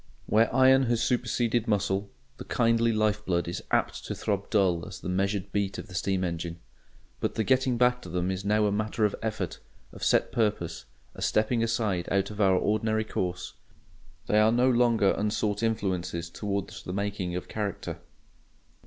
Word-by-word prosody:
Where 110 Hz, +2 st, +3 dB
iron 130 Hz, +1 st, +5 dB
has 120 Hz, 0 st, +1 dB
superseded 120 Hz, -1 st, 0 dB
muscle, 100 Hz, -1 st, 0 dB, 0.3 s
the -, -, -7 dB
kindly 115 Hz, -1 st, +2 dB
life 110 Hz, -1 st, +1 dB
blood 85 Hz, -3 st, 0 dB
is 85 Hz, -, -4 dB
apt -, -, 0 dB
to -, -, -4 dB
throb 100 Hz, -1 st, -2 dB
dull 95 Hz, -5 st, +2 dB
as -, -, -8 dB
the -, -, -5 dB
measured 100 Hz, +1 st, -1 dB
beat 100 Hz, -1 st, -1 dB
of -, -, -6 dB
the -, -, -11 dB
steam 95 Hz, +1 st, 0 dB
engine. 85 Hz, -1 st, -3 dB, 0.6 s
But -, -, -2 dB
the 110 Hz, -, +1 dB
getting 130 Hz, 0 st, +2 dB
back 125 Hz, +1 st, +3 dB
to 90 Hz, -, -9 dB
them 90 Hz, +2 st, -1 dB
is 95 Hz, +1 st, -4 dB
now 105 Hz, +1 st, +2 dB
a 105 Hz, -, +2 dB
matter 110 Hz, +2 st, 0 dB
of 105 Hz, -, 0 dB
effort, 110 Hz, -6 st, -3 dB, 0.3 s
of -, -, -9 dB
set -, -, +3 dB
purpose, 105 Hz, -7 st, -1 dB, 0.3 s
a -, -, -10 dB
stepping 110 Hz, +2 st, +1 dB
aside 110 Hz, -6 st, 0 dB
out 100 Hz, +1 st, +1 dB
of 105 Hz, 0 st, -4 dB
our 95 Hz, -2 st, +5 dB
ordinary 110 Hz, +2 st, +1 dB
course; 90 Hz, -4 st, -3 dB, 0.7 s
they 105 Hz, -, +3 dB
are 110 Hz, +1 st, +5 dB
no 125 Hz, +2 st, +3 dB
longer 120 Hz, -4 st, +3 dB
unsought 105 Hz, 0 st, -1 dB
influences 90 Hz, -6 st, -2 dB
towards 100 Hz, +1 st, -4 dB
the 90 Hz, -, -6 dB
making 100 Hz, -3 st, -2 dB
of 90 Hz, -, -4 dB
character. 105 Hz, -3 st, -4 dB
105 Hz, 180 wpm, -28 LUFS, 95-115 Hz, 0.7 s, iron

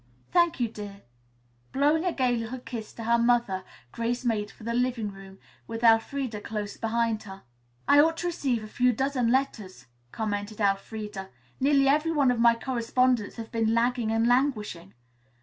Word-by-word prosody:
"Thank 345 Hz, -3 st, +3 dB
you, 240 Hz, -, +1 dB
dear." 205 Hz, -2 st, -9 dB, 0.7 s
Blowing 300 Hz, +5 st, +2 dB
a 360 Hz, -, +2 dB
gay 255 Hz, -5 st, +1 dB
little 230 Hz, +2 st, -4 dB
kiss 235 Hz, -3 st, -7 dB
to 230 Hz, -, -8 dB
her 235 Hz, +1 st, +3 dB
mother, 235 Hz, -6 st, +2 dB, 0.3 s
Grace 240 Hz, +2 st, -2 dB
made 215 Hz, -3 st, 0 dB
for -, -, -16 dB
the 235 Hz, +1 st, -2 dB
living 240 Hz, -3 st, 0 dB
room, 195 Hz, 0 st, -13 dB, 0.3 s
with 225 Hz, +1 st, -6 dB
Elfreda 225 Hz, 0 st, +2 dB
close 210 Hz, -2 st, -5 dB
behind 225 Hz, -1 st, -1 dB
her. 195 Hz, -2 st, -11 dB, 0.4 s
"I 285 Hz, -, +6 dB
ought 325 Hz, +2 st, +4 dB
to 350 Hz, -, -4 dB
receive 270 Hz, -9 st, -1 dB
a -, -, -7 dB
few 250 Hz, +3 st, +2 dB
dozen 260 Hz, -1 st, 0 dB
letters," 240 Hz, -8 st, -2 dB, 0.3 s
commented 210 Hz, -1 st, -4 dB
Elfreda. 200 Hz, 0 st, -2 dB, 0.3 s
"Nearly 275 Hz, 0 st, +3 dB
every 300 Hz, +4 st, +3 dB
one 280 Hz, -5 st, +3 dB
of 245 Hz, -, -1 dB
my 235 Hz, 0 st, +5 dB
correspondents 245 Hz, -2 st, 0 dB
have 225 Hz, -1 st, -8 dB
been 225 Hz, 0 st, +1 dB
lagging 240 Hz, -1 st, +1 dB
and 225 Hz, +1 st, +2 dB
languishing." 240 Hz, -, 0 dB
235 Hz, 165 wpm, -27 LUFS, 215-255 Hz, 0.7 s, I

